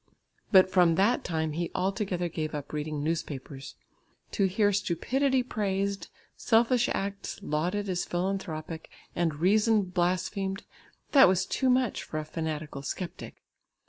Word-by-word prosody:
But 190 -2 +6
from 175 -3 +4
that 205 +7 +2
time 160 -2 -1
he 170 +3 -2
altogether 190 -2 -1
gave 155 -2 -4
up 145 0 -6
reading 150 -1 -3
newspapers. 145 -4 -4 0.6
To 200 - +1
hear 205 +2 +2
stupidity 255 - +1
praised, 200 -4 -2 0.3
selfish 240 +1 +3
acts 200 0 -3
lauded 180 +6 -1
as 180 -2 -1
philanthropic, 175 -3 -3 0.3
and 165 -3 0
reason 210 +6 +3
blasphemed, 185 +2 -1 0.5
that 275 -2 +8
was 185 0 +2
too 260 +5 0
much 250 -2 +2
for 155 - -6
a 155 - -3
fanatical 155 -2 -4
sceptic. 175 +5 -6
185 Hz, 130 wpm, -28 LUFS, 160-205 Hz, 0.6 s, that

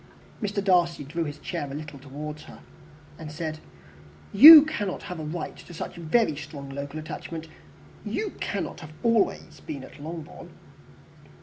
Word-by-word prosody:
Mr. 205 -1 -2
Darcy 175 -5 +2
drew 165 +4 -3
his 145 0 -6
chair 145 - -5
a 135 - -6
little 150 -2 -8
towards 150 +3 -8
her, - - -13 0.6
and 155 -2 -8
said, 155 0 -5 0.7
"You 300 +8 +12
cannot 205 -12 -4
have 180 -4 -7
a - - -5
right 155 +2 -5
to 175 - -13
such - - -6
very 170 +1 +1
strong 140 -2 -8
local 140 +2 -6
attachment. 160 +1 -7 0.6
You 420 -2 -3
cannot 200 -3 -3
have 155 -2 -12
been 230 - +3
always 220 - -1 0.2
at 130 - -13
Longbourn." 160 0 -8
160 Hz, 150 wpm, -26 LUFS, 150-190 Hz, 0.7 s, You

